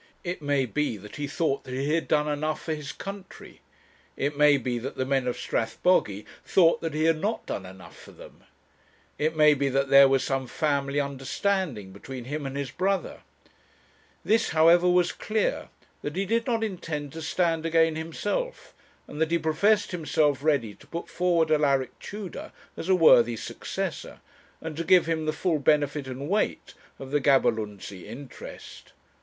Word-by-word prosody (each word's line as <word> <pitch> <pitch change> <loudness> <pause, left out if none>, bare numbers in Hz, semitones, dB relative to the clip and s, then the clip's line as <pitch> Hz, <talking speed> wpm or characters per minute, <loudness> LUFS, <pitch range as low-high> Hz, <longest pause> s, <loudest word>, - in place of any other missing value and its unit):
It 175 -1 -4
may 145 -2 +1
be 145 -2 -2
that 105 +1 -11
he 145 -1 -3
thought 145 -1 -1
that 130 - -7
he 140 +3 -1
had 165 - 0
done 150 -1 +2
enough 150 +1 -2
for 160 - -2
his 150 -2 -6
country; 195 -1 -10 0.6
it 145 +1 -1
may 145 0 +5
be 125 -2 -2
that 130 +4 -6
the 130 - -1
men 135 -1 0
of 125 - -2
Strathbogy 110 - 0 0.2
thought 170 -3 +3
that 165 -2 -3
he 155 - 0
had 160 -1 +2
not 215 +3 -2
done 95 - -5
enough 95 0 -13
for - - -14
them; - - -15 0.8
it 155 +2 0
may 150 -1 +6
be 140 -1 0
that 135 +1 0
there 140 0 +8
was 135 -1 +2
some 135 -1 -2
family 140 -1 0
understanding 140 - -2
between 125 +6 -8
him 145 +3 -4
and 135 +1 -5
his 140 -1 -3
brother. 195 +1 -1 1.1
This, 225 +1 +2
however, 170 +3 +5
was 180 -1 +3
clear, 215 -1 -2 0.3
that 145 +2 -5
he 195 +2 0
did 230 +4 0
not 230 -2 0
intend 165 -8 -4
to 160 - -7
stand 165 0 0
again 165 -1 +3
himself, 205 - -4 0.3
and 150 - -7
that 160 - +2
he 170 - +2
professed 200 +8 +2
himself 150 -4 +1
ready 140 -9 +1
to - - -19
put 170 0 -6
forward 170 -3 +1
Alaric 140 -4 +1
Tudor 205 -4 -7 0.2
as 165 - -6
a 190 - +6
worthy 120 -9 +5
successor, - - -5 0.4
and 160 -1 -6
to 165 - -2
give 180 0 +5
him 160 -1 -2
the - - +2
full 160 0 0
benefit 145 -1 +1
and 130 +2 -6
weight 205 +5 -1 0.2
of 135 0 -9
the 145 0 +1
Gaberlunzie 105 - 0
interest. 125 +5 -11
150 Hz, 175 wpm, -26 LUFS, 135-170 Hz, 1.1 s, there